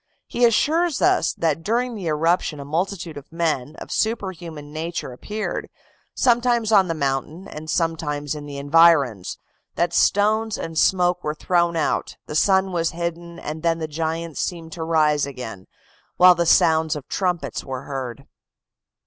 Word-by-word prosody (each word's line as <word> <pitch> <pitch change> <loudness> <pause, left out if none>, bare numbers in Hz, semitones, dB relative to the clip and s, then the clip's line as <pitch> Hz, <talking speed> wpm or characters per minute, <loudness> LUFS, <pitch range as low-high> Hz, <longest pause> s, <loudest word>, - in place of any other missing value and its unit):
He 240 - +2
assures 315 +7 +2
us 370 0 +3
that 165 0 -1
during 240 +6 0
the 195 -6 -5
eruption 160 0 +1
a 140 - -7
multitude 170 +1 -3
of 145 - -11
men 155 -4 -1
of - - -10
superhuman 175 -9 -3
nature 160 -4 -4
appeared, 210 +12 -4 0.5
sometimes 240 -2 +2
on 195 -3 +5
the 165 - -2
mountain 145 +5 -2
and 155 +1 -8
sometimes 155 -4 -1
in 150 -1 -7
the 140 -1 -7
environs, 140 - +3 0.4
that 170 0 0
stones 215 +4 +2
and 165 0 -6
smoke 180 +1 +2
were 150 0 -2
thrown 170 +1 +1
out, 160 - -1
the - - -7
sun 190 +4 +3
was 165 -2 0
hidden, 170 0 -4
and 155 +1 -6
then 165 0 +1
the 160 -1 -4
giants 160 +1 -3
seemed 165 -2 -4
to 165 0 -5
rise 150 -3 +2
again, 120 -8 -8 0.5
while 180 0 +8
the 170 -1 -1
sounds 160 -1 +4
of 145 - -8
trumpets 180 -3 -2
were 130 -1 -6
heard. 135 -1 -6
165 Hz, 155 wpm, -22 LUFS, 150-185 Hz, 0.5 s, while